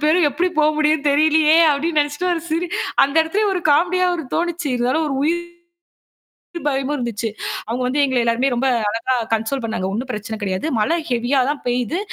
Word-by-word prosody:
பேரு 315 +4 +4
எப்படி 340 +7 0
போ 305 - +4
முடியும் 305 -1 +1
தெரியலயே! 310 +2 +4
அப்படின்னு 305 +2 +1
நினைச்சுட்டு 290 +5 -2
ஒரு 335 - -1
சிரி 330 +3 0 0.4
அந்த 275 +2 +1
இடத்துலயே 400 +7 0
ஒரு 360 - -1
காமெடியா 360 +5 +3
ஒரு 330 - -4
தோணுச்சு. 345 -3 -1
இருந்தாலும் 255 +6 0
ஒரு 275 - -2
உயிர் 335 +4 +1 1.3
பயமும் 275 +1 -1
இருந்துச்சு. 235 -3 -3 0.4
அவங்க 240 +3 -3
வந்து 280 +3 -1
எங்கள 260 -2 -1
எல்லாரையும் 245 +3 +1
ரொம்ப 265 +3 0 0.2
அழகா 230 +4 -1 0.2
கன்ஸோல் 225 +4 -1
பண்ணாங்க. 205 -5 -3
ஒண்ணும் 250 +4 -4
பிரச்சனை 215 0 -5
கிடையாது. 190 +9 -2
மழை 325 +11 +1
ஹெவியா 245 +3 +1
தான் 290 - -3
பெய்து. 250 - -1
285 Hz, 175 wpm, -20 LUFS, 245-320 Hz, 1.3 s, பேரு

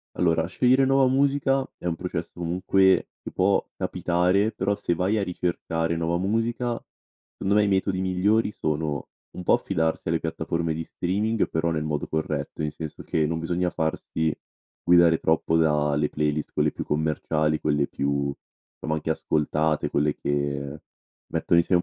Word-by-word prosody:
Allora 85 -1 +2
scegliere 130 +7 +3
nuova 135 0 +4
musica 135 0 +2
è - - -12
un 85 -1 0
processo - - -4
comunque 95 +2 +2
che - - -7
può 95 +1 +2
capitare, 90 +5 +1
però 100 +1 -1
se 85 -4 -1
vai 95 +5 +1
a 100 - +1
ricercare 85 -2 -2
nuova 85 +1 0
musica, 115 +5 0 0.6
secondo 100 +1 -1
me 105 - +5
i - - +1
metodi 95 -1 +1
migliori 100 +4 +2
sono: 75 -5 -2 0.3
un 90 - -6
po' - - +3
affidarsi 80 +1 0
alle 80 0 +1
piattaforme 80 0 -2
di 80 - -4
streaming, 105 +7 -1
però 80 +1 0
nel 80 -2 -1
modo 75 -2 -2
corretto, 80 0 -3
nel 75 - -1
senso 80 -2 -7
che 80 -1 0
non 80 0 -2
bisogna 90 +2 0
farsi 80 -1 -1 0.5
guidare 85 -2 +5
troppo 80 0 +2
da 75 -2 +2
le 75 0 +1
playlist 75 0 -1
quelle - - +2
più - - -5
commerciali, 75 0 0
quelle 75 -2 +1
più, 70 0 -1 0.5
somma 80 0 -2
anche 80 +1 -2
ascoltate, 75 0 0
quelle 75 +1 +1
che 70 0 -2 0.5
mettono 85 - +3
insieme 85 +1 +3
85 Hz, 160 wpm, -25 LUFS, 75-95 Hz, 0.6 s, me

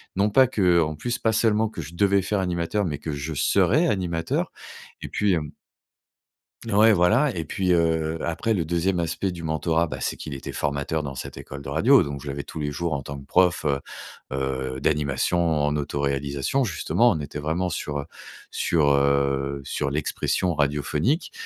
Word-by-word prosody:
non 100 +2 +2
pas 130 +5 +6
que 90 -8 +3
en 80 -1 -1
plus, 120 +10 -3
pas 110 - +1
seulement 110 0 +2
que 95 - -6
je 75 +4 -10
devais 100 +2 +3
faire 100 +2 -1
animateur 90 +2 -1
mais 75 -5 -2
que 75 +2 -5
je 70 +2 -4
serais 100 - +3
animateur 85 - -1 0.5
et - - -4
puis, 100 -2 +1
hem 75 -4 -2 1.2
ouais, 110 +2 +6
voilà 110 +10 +3
et 80 - -2
puis, 90 +2 0
heu, 80 -1 +1
après, 85 +7 0
le 90 -5 0
2e 85 +3 0
aspect 85 +3 -2
du 85 -1 -8
mentorat, 80 +1 0
bah, - - -5
c'est - - -2
qu'il 75 - -8
était 65 - -6
formateur 75 +2 -2
dans 70 -2 -6
cette - - -7
école 70 - -8
de 70 - -9
radio 105 - +5
donc, 70 -2 -6
je 75 - -7
l'avais 70 +1 -4
tous 80 - -7
les 75 -1 -1
jours 85 +3 -2
en 70 - -3
tant 70 +1 -7
que 70 - -11
prof, 90 +1 +3
heu 70 -2 +1 0.5
heu, 65 -1 -2
d'animation 75 +3 +1 0.3
en 75 0 +1
autoréalisation, 70 - -1
justement, 120 +3 +2
on 80 - -1
était 75 0 -6
vraiment 80 +5 -1
sur, 75 -4 -3
heu 70 - -4 0.5
sur, 75 -4 +2
heu, 70 0 +1
sur 70 +1 -2
l'expression 80 +4 -1
radiophonique 75 - 0
80 Hz, 185 wpm, -24 LUFS, 70-95 Hz, 1.2 s, pas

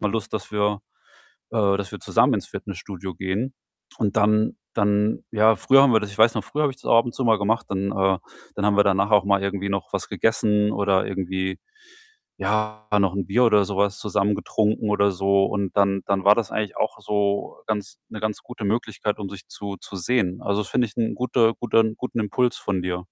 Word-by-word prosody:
mal 105 - 0
Lust, 110 0 -3
dass 110 - -4
wir 105 -1 0 0.7
äh, 100 -3 +2
dass 100 -1 -5
wir - - -7
zusammen - - +3
ins - - -4
Fitnessstudio 95 -2 -7
gehen?“, 100 +10 -3 0.4
und 100 - -1
dann 105 +1 +2 0.2
dann 105 0 +1
ja, 110 0 +4
früher 135 +7 +5
haben 140 - +5
wir 110 - +5
das 105 -1 -6
ich 100 - -12
weiß 110 +1 +5
noch, - - -2
früher 150 +1 -2
habe 145 - +2
ich 130 - -15
das - - -20
auch - - +5
ab 115 - 0
und 120 - -6
zu 130 - -2
mal 110 -2 +4
gemacht. 110 +3 0
Dann 100 0 -1
äh, 95 -1 +2 0.4
dann 100 - -1
haben 105 -1 +2
wir 105 - +6
danach 100 +1 +2
auch 105 -2 +5
mal 100 -1 +2
irgendwie 100 0 -2
noch 100 -2 -3
was - - -3
gegessen 105 -2 +1
oder 100 -2 +1
irgendwie, 95 0 -3 0.8
ja, 110 +2 -2
noch 95 -2 +2
'n 100 - -2
Bier 120 +6 +3
oder 105 -3 +4
so 100 - -5
was 100 0 +1
zusammen 105 0 0
getrunken 110 +1 0
oder 100 -1 +3
so, 95 +1 +2
und 100 -2 -3
dann 100 -1 +2
dann 100 -1 0
war 105 +1 +7
das 115 -3 -2
eigentlich 105 -3 -3
auch - - -2
so 100 -1 -1
ganz 105 -1 -4
'ne 110 - -7
ganz 110 0 -3
gute 125 -4 -7
Möglichkeit, 110 -1 -2
um 100 -2 -5
sich 95 0 -11
zu 100 -1 -7
zu 100 - -11
sehen. 95 -2 0
Also, 100 +1 0
das 105 - -7
finde 125 - +2
ich 105 - -17
'n 115 -2 0
gute 120 -2 +2
guten 110 -1 +2
guten 125 -2 -4
Impuls 125 +4 0
von 95 -3 -2
dir. 90 -1 -2
105 Hz, 225 wpm, -23 LUFS, 100-110 Hz, 0.8 s, war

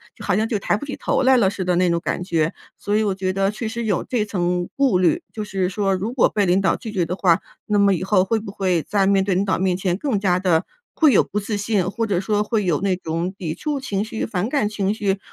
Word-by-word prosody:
就 - - -12
好 - - +1
像 220 +1 +1
就 220 -3 -1
抬 205 - 0
不 250 - -7
起 280 - -5
头 - - 0
来 260 0 +5
了 205 -6 +4
似 190 -1 -4
的 180 0 +1
那 180 0 +3
种 170 0 +1
感 - - -2
觉。 165 -3 0 0.2
所 205 - -2
以 215 - +3
我 200 -3 0
觉 185 -1 -2
得 195 0 +1
确 220 +2 -5
实 235 +1 -4
有 200 -5 0
这 240 -4 -1
层 180 -3 -1
顾 270 -10 +3
虑， 310 - +2
就 215 - -4
是 190 -3 -1
说 195 0 0
如 205 +6 -3
果 260 - +3
被 205 -2 +1
领 185 +2 +3
导 195 - +2
拒 225 - -7
绝 190 -4 0
的 175 +2 -3
话， 175 -4 +3 0.3
那 210 -1 +1
么 200 -1 +4
以 175 - -4
后 190 -1 +3
会 220 +4 0
不 210 -2 -8
会 185 -5 0
在 200 -2 +1
面 195 -1 +3
对 195 0 0
领 185 +2 +1
导 195 - 0
面 185 -1 +1
前 185 -1 -1
更 230 -3 -1
加 185 -3 +2
地 180 -3 +2 0.3
会 310 -3 +5
有 - - +5
不 210 - -3
自 210 +1 -3
信， 205 -3 0
或 225 +3 -2
者 200 -5 0
说 210 +2 0
会 210 -1 -1
有 170 -4 +1
那 195 -2 +1
种 170 +1 -3
抵 165 -6 -4
触 295 -2 -3
情 205 -7 -2
绪、 225 0 -4
反 200 +1 -2
感 275 -7 +1
情 205 -1 -1
绪。 200 -2 -1
195 Hz, 300 characters per minute, -21 LUFS, 185-215 Hz, 0.3 s, 来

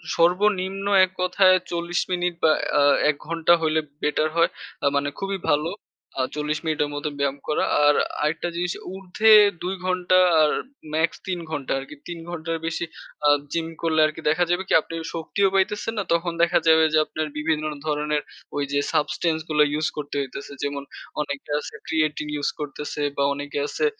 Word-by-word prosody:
সর্বনিম্ন 190 +2 +2 0.2
এক 185 - -16
কথায় 185 +1 +5 0.2
৪০ 170 0 -1
মিনিট 180 -1 0
বা 160 - +6 0.3
আ - - +5 0.3
১ 150 - +2
ঘন্টা 165 0 +3
হইলে 160 0 +2 0.2
বেটার 150 +1 +1
হয়। 170 - +4 0.3
আ - - +1
মানে 140 0 +1
খুবই 195 0 -2
ভালো। 150 +3 +2 0.5
আ - - +3
৪০ 150 +1 -1
মিনিটের 155 -2 0
মতো 145 +1 -2
ব্যায়াম 140 0 0
করা। 150 - +1 0.2
আর 145 - +6 0.3
আরেকটা 155 +3 0
জিনিস 175 0 -1 0.2
উর্ধ্বে 195 +3 +2 0.3
২ 185 +2 -2
ঘণ্টা 185 0 +2 0.2
আর 150 - +4 0.4
ম্যাক্স 160 +3 +1
৩ 180 -2 -2
ঘন্টা 145 -4 -4
আরকি। 135 +2 -9
৩ 170 -1 -6
ঘন্টার 165 -1 -3
বেশি 165 +1 -2 0.4
আ - - +7 0.2
জিম 165 -1 -1
করলে 160 -1 +1
আরকি 155 +1 -3
দেখা 160 +3 +3
যাবে 175 +2 +1
কি - - 0
আপনি 165 - -11 0.2
শক্তিও 180 +4 +1
পাইতেছেন 210 +3 0
না, 205 - 0
তখন 170 +1 0
দেখা 170 - +4
যাবে 160 0 +6
যে 155 - +5
আপনার 155 0 -3
বিভিন্ন 155 0 0 0.2
ধরনের 150 0 0 0.4
ওইযে 140 0 0
subtance 160 +1 0
গুলো 150 -1 +3
ইউস 155 +1 0
করতে 145 -1 -5
হইতাছে। 140 +1 -7
যেমন 140 -1 -3 0.4
অনেকে 140 -1 -5
আছে - - -8
creatine 155 -1 0
ইউস 145 -1 0
করতেছে 150 0 -5 0.2
বা 140 - +2
অনেকে 145 +1 -6
আ - - 0
আছে - - -1
160 Hz, 175 wpm, -24 LUFS, 150-175 Hz, 0.5 s, আ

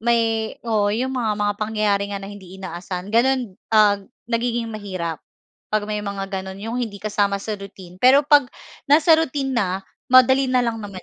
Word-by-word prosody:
may 225 -1 +1
oo, 215 -3 +1
'yong 255 +4 -1
mga, 235 -5 0
mga 205 0 +1
pangyayari 210 -2 0
nga 200 - -3
na 195 - -8
hindi 190 -2 -12
inaasahan 180 +1 -6
gano'n, 245 -1 +2 0.2
ah, 210 -2 +5 0.3
nagiging 235 0 -1
mahirap 185 -6 -5 0.5
'pag 215 -1 +1
may 210 0 -2
mga 200 -1 -4 0.2
gano'n, 190 0 -8
'yong 225 +3 -4
hindi 220 -4 -4
kasama 205 -1 0
sa 215 - -4
routine. 190 -2 -12
Pero 260 +3 +7
'pag 290 -1 +5 0.4
nasa 305 +3 +5
routine 285 -4 -1
na 190 -3 0 0.3
madali 260 +1 +6
na 255 -1 +2
lang 230 -2 -2
naman 200 -3 -8
215 Hz, 175 wpm, -22 LUFS, 200-245 Hz, 0.5 s, Pero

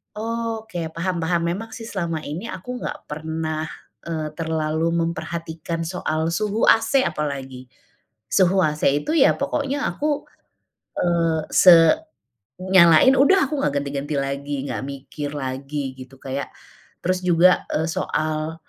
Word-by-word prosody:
Oh, 230 +1 -3
oke 220 -5 -9 0.2
paham 180 +2 -2
paham. 170 +1 0
Memang 220 +6 -5
sih, 225 -1 -8
selama 170 -6 -3
ini 155 +8 -6
aku 230 +4 -6
enggak - - -5
pernah, 160 0 -3 0.4
eee, 160 -2 -3
terlalu 160 0 -1
memperhatikan 165 0 -4
soal 165 -2 -2
suhu 210 +5 +1
AC, 225 +4 +4
apalagi. 140 - -4 0.6
Suhu 190 0 +3
AC 150 -3 0 0.2
itu, - - -3
ya 275 - +6
pokoknya 280 0 -1
aku, 295 -1 -1 0.8
eee, 165 -2 +1
se 180 -2 +8 0.9
nyalain 185 +5 +6
udah 330 +8 +6
aku 300 - -1
enggak 145 - 0
ganti-ganti 140 +1 -4
lagi, 140 0 -2
enggak 125 -5 -3
mikir 140 +1 -6
lagi, 135 +1 -4
gitu, 130 +1 -11
kayak 135 +1 -4 0.6
terus 185 +1 +1
juga 180 +1 +4 0.2
soal, 155 0 -2
165 Hz, 130 wpm, -22 LUFS, 150-190 Hz, 0.9 s, se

